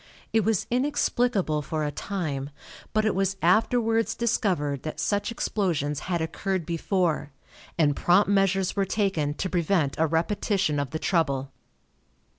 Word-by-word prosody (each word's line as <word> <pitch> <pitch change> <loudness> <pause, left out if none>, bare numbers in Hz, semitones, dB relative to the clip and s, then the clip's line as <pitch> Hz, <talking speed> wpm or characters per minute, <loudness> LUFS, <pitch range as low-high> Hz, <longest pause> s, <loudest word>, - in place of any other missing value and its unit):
It 220 -1 +3
was 220 -3 +1
inexplicable 245 - +1
for 155 +1 -3
a 150 - -1
time, 145 -8 -3 0.4
but 215 0 +1
it 215 - +2
was 195 0 0
afterwards 225 +4 +2
discovered 180 - 0
that 155 - -6
such 205 +2 0
explosions 160 -11 -1
had 170 -2 0
occurred 185 +1 -2
before, 170 -2 -1 0.5
and 145 -4 +3
prompt 180 +7 +4
measures 195 -2 +2
were 200 - +2
taken 190 -8 0
to 190 - -2
prevent 170 -5 +1
a 160 - +3
repetition 170 0 0
of 140 -2 -2
the 160 - -3
trouble. 140 -6 0
180 Hz, 140 wpm, -26 LUFS, 155-205 Hz, 0.5 s, prompt